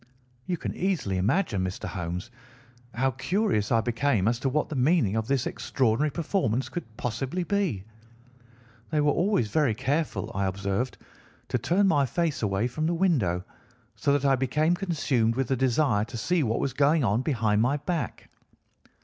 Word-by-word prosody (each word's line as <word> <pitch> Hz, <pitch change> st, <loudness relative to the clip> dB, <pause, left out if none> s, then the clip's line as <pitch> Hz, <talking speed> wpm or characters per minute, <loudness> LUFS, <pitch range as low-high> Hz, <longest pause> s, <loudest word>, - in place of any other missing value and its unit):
"You 180 Hz, -, -1 dB
can -, -, -4 dB
easily 165 Hz, -, -1 dB
imagine, 110 Hz, -, +1 dB
Mr. 95 Hz, +1 st, -4 dB
Holmes, 90 Hz, +5 st, -5 dB, 0.6 s
how 135 Hz, +2 st, +1 dB
curious 130 Hz, -, 0 dB
I 115 Hz, -1 st, +4 dB
became 115 Hz, -3 st, +1 dB
as 115 Hz, +1 st, +1 dB
to 135 Hz, -, 0 dB
what 150 Hz, +3 st, 0 dB
the 155 Hz, -, -4 dB
meaning 130 Hz, -, +2 dB
of 110 Hz, 0 st, -1 dB
this 135 Hz, -2 st, +1 dB
extraordinary 130 Hz, +4 st, 0 dB
performance 145 Hz, -, -1 dB
could 115 Hz, -11 st, -7 dB
possibly 130 Hz, +10 st, -2 dB
be. 180 Hz, -, -1 dB, 1.1 s
They 155 Hz, -, 0 dB
were 145 Hz, 0 st, +3 dB
always 175 Hz, -, +1 dB
very 135 Hz, -2 st, +2 dB
careful, 140 Hz, -4 st, -1 dB
I 95 Hz, 0 st, 0 dB
observed, 100 Hz, +6 st, -2 dB, 0.5 s
to 125 Hz, -, 0 dB
turn 185 Hz, -, +2 dB
my 145 Hz, -7 st, +3 dB
face 165 Hz, +3 st, -1 dB
away 105 Hz, +1 st, 0 dB
from 155 Hz, +6 st, -2 dB
the 170 Hz, -, 0 dB
window, 125 Hz, -, +1 dB, 0.5 s
so 145 Hz, -, 0 dB
that 140 Hz, -1 st, +1 dB
I 135 Hz, -1 st, +5 dB
became 150 Hz, +6 st, +1 dB
consumed 145 Hz, -, 0 dB
with 130 Hz, -1 st, -1 dB
the 135 Hz, -, +2 dB
desire 125 Hz, -3 st, +2 dB
to 115 Hz, +1 st, -7 dB
see 175 Hz, +9 st, +1 dB
what 115 Hz, -4 st, 0 dB
was 135 Hz, -, -1 dB
going 145 Hz, +3 st, +3 dB
on 110 Hz, +1 st, +2 dB
behind 115 Hz, -7 st, +1 dB
my 130 Hz, +5 st, +2 dB
back. 165 Hz, +2 st, -4 dB
130 Hz, 170 wpm, -27 LUFS, 110-155 Hz, 1.1 s, I